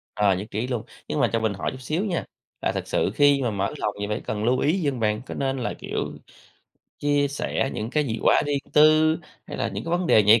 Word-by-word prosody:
Ờ, 100 -3 +3
nhất 100 +4 -5
trí 110 +4 -2
luôn, 120 -4 -2 0.2
nhưng 150 - -2
mà 120 - +3
cho 115 - +2
mình 110 -2 0
hỏi 100 - -3
chút 130 - -8
xíu 155 - -1
nha, 180 -5 -2 0.4
là - - +1
thật - - -4
sự - - +1
khi 145 -1 +5
mà 120 -3 0
mở 100 +4 -1
lòng 105 -6 -1
thì 100 - -2
phải 105 - -2
cần 105 0 -3
lưu 125 +2 +2
ý 165 +7 +2
gì 145 - +2
hông 130 -4 -4
bạn? 105 0 0
Có - - -6
nên 135 -1 -1
là, 120 - -2
kiểu, - - -3 0.9
chia 145 -1 +2
sẻ 140 -1 -1
những 110 +2 -3
cái 150 +2 +1
gì 115 -1 -2
quá - - +5
riêng 145 -1 +1
tư, 155 +2 +5 0.3
hay - - -6
là - - -1
những - - -5
cái 165 - -4
vấn 175 0 +1
đề 110 - +6
nhạy 110 +3 +6
130 Hz, 265 wpm, -24 LUFS, 110-145 Hz, 0.9 s, đề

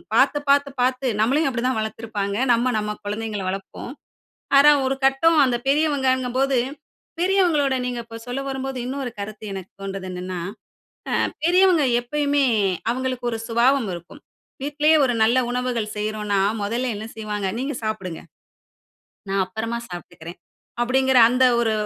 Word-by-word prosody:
பார்த்து, 290 - +4
பார்த்து, 280 0 +4
பார்த்து 255 +1 +1
நம்மளையும் 270 +6 +2
அப்பிடி 250 -1 -3
தான் 260 - 0
வளர்த்திருப்பாங்க. 215 -2 -3 0.2
நம்ம, 240 +2 +1
நம்ம 210 0 -3
குழந்தைங்கள 210 -1 -3
வளர்ப்போம். 195 +6 -6 0.6
ஆனா, 290 +2 +8
ஒரு 265 +1 0
கட்டம் 310 +5 +4
அந்த 250 -2 +1
பெரியவங்கங்கம்போது, 270 -3 +1 0.6
பெரியவங்களோட 345 -7 +2
நீங்க 245 -1 -3
இப்போ 230 - -11
சொல்ல 245 +2 -3
வரும்போது, 270 -1 -4
இன்னொரு 260 -1 -4
கருத்து 210 +1 -7
எனக்கு 190 -1 -8
தோண்றுது 195 -1 -5
என்னன்னா, 180 0 -5 0.8
ஆ - - +2 0.2
பெரியவங்க 355 -2 +4 0.2
எப்பயுமே 285 +3 0 0.5
அவுங்களுக்கு 255 0 -2
ஒரு 225 - -2
சுபாவம் 240 +1 +2
இருக்கும். 175 - -11 0.4
வீட்டிலேயே 295 +2 +3
ஒரு 245 -2 +1
நல்ல 235 +4 +4
உணவுகள் 245 -4 -2
செய்றோன்னா, 210 -1 -1 0.2
முதல்ல 235 +4 -1
என்ன 215 +2 -6
செய்வாங்க? 210 -2 -3
"நீங்க 275 +3 -2
சாப்பிடுங்க. 195 -6 -4 1.1
நான் 195 0 +1
அப்பறமா 220 +5 -4
சாப்பிட்டுக்கிறேன்". 175 -1 -9 0.4
அப்பிடிங்கிற 260 +1 +2
அந்த 255 +1 +3
ஒரு 230 -2 +2
245 Hz, 135 wpm, -22 LUFS, 215-270 Hz, 1.1 s, ஆனா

